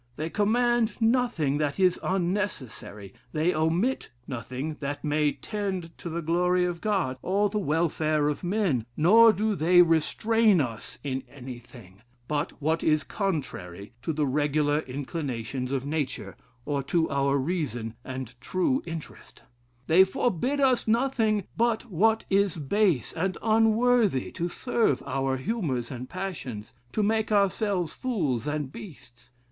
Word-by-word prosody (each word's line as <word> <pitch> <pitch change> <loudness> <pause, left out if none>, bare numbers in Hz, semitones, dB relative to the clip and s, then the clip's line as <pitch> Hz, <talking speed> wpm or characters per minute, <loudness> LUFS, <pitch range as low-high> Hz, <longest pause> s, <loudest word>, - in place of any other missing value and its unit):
They 155 +4 -4
command 235 +1 +2
nothing 225 - +1
that 150 +2 -1
is 185 -2 +3
unnecessary, 170 - -3 0.2
they 160 +3 +1
omit 165 +11 0 0.2
nothing 130 +5 -5
that 145 0 -4
may 150 -1 +1
tend 190 -5 -4
to 170 - -6
the 170 +1 -3
glory 180 +2 +2
of 175 -1 -3
God, 190 -12 0
or 200 +2 +1
the 210 +1 -1
welfare 155 -3 +1
of 150 +3 -2
men, 175 - 0
nor 220 +8 +7
do 215 +1 0
they 175 0 +5
restrain 205 +6 +3
us 115 -6 -4
in 135 -2 -2
anything, 120 -7 -11 0.3
but 150 -1 -1
what 160 +2 0
is 155 -1 +3
contrary 120 - -4
to 160 - -2
the 150 -1 0
regular 145 +1 +1
inclinations 130 -3 -4
of 135 -1 -1
nature, 140 - -3 0.3
or 145 -1 -1
to 160 +4 +1
our 140 0 +2
reason, 130 -7 -2
and 130 -2 -6
true 185 - 0
interest; 165 -2 -9 0.4
they 170 +6 +6
forbid 245 - 0
us 260 -4 +2
nothing 225 -3 +2
but 230 0 0
what 220 +6 +2
is 200 -2 +2
base 160 - +1
and 185 +2 -1
unworthy 225 - +3
to 175 -1 -3
serve 225 - 0
our 135 -1 -1
humors 135 - -2
and 125 0 -7
passions, 165 - -6 0.2
to 215 - 0
make 220 +1 +1
ourselves 200 -3 +1
fools 155 - -1
and 150 -2 -2
beasts. 120 - -12
165 Hz, 140 wpm, -27 LUFS, 140-205 Hz, 0.4 s, nor